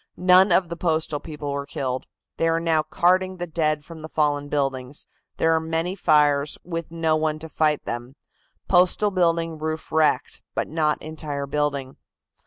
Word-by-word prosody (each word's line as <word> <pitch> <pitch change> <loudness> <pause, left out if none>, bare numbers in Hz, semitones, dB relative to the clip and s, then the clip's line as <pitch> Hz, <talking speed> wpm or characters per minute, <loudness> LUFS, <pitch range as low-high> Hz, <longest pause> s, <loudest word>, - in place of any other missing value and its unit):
None 185 +1 +5
of 175 0 +3
the 170 - -4
Postal 160 -3 0
people 150 -2 -6
were 140 0 -4
killed. 130 -2 -3 0.3
They 165 - +1
are 165 0 +2
now 165 -2 +2
carting 185 +4 +1
the 175 - -3
dead 155 -3 -1
from 165 -1 -10
the 155 0 -8
fallen 145 -2 0
buildings. 135 -1 -2 0.3
There 165 0 +3
are 160 - +3
many 165 +3 -2
fires, 150 -4 +3
with 165 -2 -5
no 165 -1 +1
one 155 0 0
to 160 +1 -8
fight 155 -1 +1
them. 120 +3 -5 0.5
Postal 185 +3 +3
building 165 -3 0
roof 155 +1 -4
wrecked, 155 -2 +1
but - - -1
not 155 -1 0
entire 150 -2 -4
building." 140 -2 -2
155 Hz, 170 wpm, -24 LUFS, 145-165 Hz, 0.5 s, None